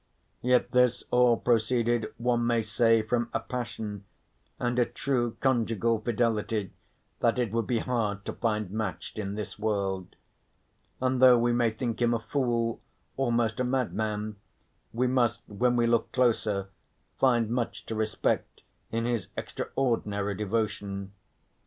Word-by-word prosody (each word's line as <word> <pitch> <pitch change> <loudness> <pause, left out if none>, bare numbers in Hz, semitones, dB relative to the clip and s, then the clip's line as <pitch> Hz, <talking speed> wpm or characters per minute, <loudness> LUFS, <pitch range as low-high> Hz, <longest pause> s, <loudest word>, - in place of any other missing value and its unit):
Yet 125 0 +2
this 125 -1 +3
all 125 -1 +5
proceeded 115 -1 +1
one 120 0 +1
may 115 -1 +2
say 115 +1 +3
from 120 +1 0
a - - +3
passion, 110 -5 -5 0.5
and 120 0 0
a 120 - +4
true 120 -4 -1
conjugal 115 -3 +1
fidelity, 110 -3 0 0.5
that 120 +1 +2
it 120 -5 0
would 115 -1 -1
be 120 - +1
hard 105 -4 -1
to - - -3
find 105 -4 -1
matched 110 -1 -4
in 100 -1 -3
this 105 0 -6
world. 100 -4 -2 0.8
And 130 0 +1
though 125 -1 +8
we 120 0 +2
may 120 -1 +3
think 115 +1 -3
him 120 0 +3
a - - -1
fool, 115 -1 -1 0.3
almost 120 -4 +1
a - - +2
madman, 110 -4 -1 0.5
we 125 +3 0
must, 120 -3 +1
when 120 +4 +1
we 120 -1 +3
look 115 -1 +1
closer, 110 -6 +1 0.5
find 120 -4 +3
much 120 -1 -2
to - - -4
respect 110 0 -1 0.3
in 115 +1 -1
his 120 -6 -1
extraordinary 105 -6 -1
devotion. 100 -1 -2
115 Hz, 140 wpm, -28 LUFS, 110-120 Hz, 0.8 s, though